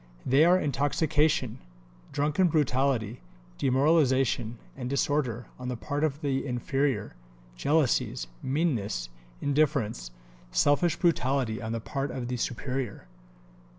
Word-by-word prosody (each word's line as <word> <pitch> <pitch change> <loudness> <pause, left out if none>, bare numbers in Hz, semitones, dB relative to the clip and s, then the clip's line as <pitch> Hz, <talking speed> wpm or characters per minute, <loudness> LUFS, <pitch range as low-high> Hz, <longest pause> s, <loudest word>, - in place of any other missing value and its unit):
They 140 +5 +5
are 180 +2 +6
intoxication, 150 +1 +1 0.5
drunken 150 +5 +2
brutality, 130 -7 +1 0.4
demoralization 130 -4 +2 0.2
and 125 -2 -5
disorder 135 -4 0
on 125 - -5
the 125 -1 -3
part 145 +5 -3
of 150 -1 0
the 135 -3 0
inferior; 130 - -1 0.4
jealousies, 140 - +1 0.2
meanness, 125 - -1 0.3
indifference, 140 - +1 0.4
selfish 145 - +3
brutality 130 -8 +1
on 110 0 -4
the 115 - -2
part 135 +5 -3
of 125 -2 -4
the 125 - -2
superior." 125 -1 -3
135 Hz, 110 wpm, -28 LUFS, 120-145 Hz, 0.5 s, are